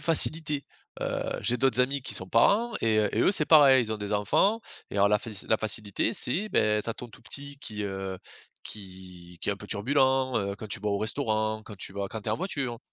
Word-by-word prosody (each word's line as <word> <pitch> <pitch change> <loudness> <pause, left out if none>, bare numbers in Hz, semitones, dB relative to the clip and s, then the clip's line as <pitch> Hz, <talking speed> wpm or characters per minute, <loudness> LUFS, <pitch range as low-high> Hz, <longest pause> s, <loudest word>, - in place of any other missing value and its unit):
facilité. 155 -3 +3 0.4
Heu, - - -3
j'ai 125 - +3
d'autres 130 -1 +2
amis 135 +2 0
qui - - -3
sont 95 - -4
parents 220 - +3
et 110 -1 +2
heu, 105 -1 +2
et 115 - +2
eux - - +4
c'est 155 -6 +3
pareil 140 -5 +7
ils 110 - -6
ont - - -2
des 105 0 -5
enfants 150 - +2 0.3
et - - -6
alors 100 0 +4
la 105 0 +3
faci 105 -2 -4
la 110 - +3
facilité 110 0 0
c'est 190 - +1
beh, 105 -1 +2
tu - - -3
as - - -2
ton 125 - -9
tout 115 - -17
petit 140 +3 -4
qui, 105 -7 -6
heu 95 -1 -5 0.4
qui 90 -3 -9
qui - - -4
est - - +3
un 100 - -7
peu 105 - -11
turbulent, 130 +4 +1
heu, 100 -1 -1
quand 105 +2 -9
tu 105 - -2
vas 105 - -2
au 100 - 0
restaurant, 110 -1 0
quand 105 - -10
tu 95 - -4
vas 100 -1 -3
quand 110 - -5
tu 105 - -6
es - - +1
en - - -1
voiture. 140 -10 -2
110 Hz, 245 wpm, -27 LUFS, 100-135 Hz, 0.4 s, pareil